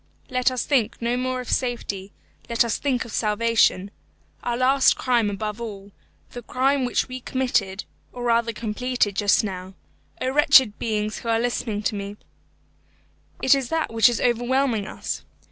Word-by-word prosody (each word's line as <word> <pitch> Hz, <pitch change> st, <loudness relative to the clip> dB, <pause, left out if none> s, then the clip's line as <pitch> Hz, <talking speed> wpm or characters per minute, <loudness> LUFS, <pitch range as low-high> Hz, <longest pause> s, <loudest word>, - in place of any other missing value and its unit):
Let 255 Hz, 0 st, +2 dB
us 255 Hz, -2 st, -3 dB
think 255 Hz, -7 st, +1 dB
no 235 Hz, +1 st, 0 dB
more 255 Hz, 0 st, -2 dB
of 250 Hz, -, -7 dB
safety 205 Hz, -6 st, -2 dB, 0.4 s
let 235 Hz, 0 st, +2 dB
us 230 Hz, -, -1 dB
think 260 Hz, -5 st, 0 dB
of 235 Hz, -, -10 dB
salvation. 210 Hz, -3 st, +2 dB, 0.5 s
Our 240 Hz, -1 st, -2 dB
last 260 Hz, +2 st, +4 dB
crime, 240 Hz, -4 st, +1 dB
above 210 Hz, +2 st, -4 dB
all, 200 Hz, -3 st, -7 dB, 0.4 s
the 245 Hz, -, -7 dB
crime 265 Hz, +3 st, +1 dB
which 245 Hz, -, 0 dB
we 255 Hz, 0 st, -6 dB
committed, 240 Hz, -7 st, -1 dB, 0.3 s
or 245 Hz, -, -7 dB
rather 235 Hz, -1 st, +2 dB
completed, 225 Hz, -1 st, -1 dB
just 205 Hz, +2 st, +3 dB
now 190 Hz, -2 st, -6 dB, 0.4 s
O 260 Hz, -, -1 dB
wretched 265 Hz, -6 st, +5 dB
beings 215 Hz, -1 st, -2 dB
who 230 Hz, -, -6 dB
are 225 Hz, 0 st, +2 dB
listening 230 Hz, -3 st, -2 dB
to 215 Hz, -, 0 dB
me 200 Hz, 0 st, -6 dB, 1.3 s
it 260 Hz, -, +6 dB
is 270 Hz, -3 st, 0 dB
that 320 Hz, -7 st, -1 dB
which 225 Hz, +2 st, +6 dB
is 240 Hz, -, -2 dB
overwhelming 240 Hz, -2 st, +1 dB
us. -, -, -5 dB
235 Hz, 160 wpm, -23 LUFS, 210-255 Hz, 1.3 s, it